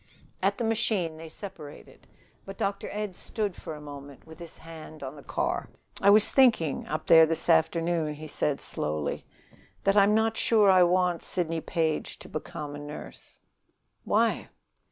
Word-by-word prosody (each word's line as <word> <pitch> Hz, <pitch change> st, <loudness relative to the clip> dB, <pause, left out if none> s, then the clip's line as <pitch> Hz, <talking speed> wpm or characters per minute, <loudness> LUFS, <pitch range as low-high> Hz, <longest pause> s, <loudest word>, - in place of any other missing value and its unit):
At -, -, +1 dB
the 240 Hz, -, -2 dB
machine 215 Hz, -7 st, 0 dB
they 160 Hz, 0 st, -9 dB
separated. 155 Hz, -5 st, -11 dB, 0.4 s
But 195 Hz, 0 st, -9 dB
Dr. 200 Hz, 0 st, -2 dB
Ed 210 Hz, -3 st, -4 dB
stood 205 Hz, -2 st, -3 dB
for 160 Hz, -, -7 dB
a -, -, -10 dB
moment 145 Hz, -2 st, -11 dB
with 160 Hz, +1 st, -13 dB
his 170 Hz, -2 st, -10 dB
hand 160 Hz, -2 st, -11 dB
on 135 Hz, +2 st, -6 dB
the 145 Hz, -, -11 dB
car. -, -, -2 dB, 0.3 s
"I 200 Hz, -, +5 dB
was 210 Hz, +1 st, +6 dB
thinking, 225 Hz, -, +3 dB
up 155 Hz, -, -3 dB
there 160 Hz, -1 st, +7 dB
this 165 Hz, 0 st, -1 dB
afternoon," 165 Hz, -1 st, +2 dB
he 155 Hz, +1 st, -9 dB
said 145 Hz, -1 st, 0 dB
slowly, 75 Hz, -1 st, -3 dB, 0.6 s
"that 195 Hz, 0 st, +3 dB
I'm 205 Hz, +1 st, +5 dB
not 225 Hz, 0 st, +1 dB
sure 210 Hz, -4 st, +4 dB
I 185 Hz, -1 st, +6 dB
want 180 Hz, -1 st, +2 dB
Sidney 165 Hz, -3 st, -2 dB
Page 160 Hz, -2 st, -2 dB
to -, -, -12 dB
become 150 Hz, -1 st, -6 dB
a 145 Hz, -, -7 dB
nurse." 145 Hz, +1 st, -10 dB, 0.7 s
"Why?" -, -, +1 dB
165 Hz, 165 wpm, -27 LUFS, 155-195 Hz, 0.7 s, there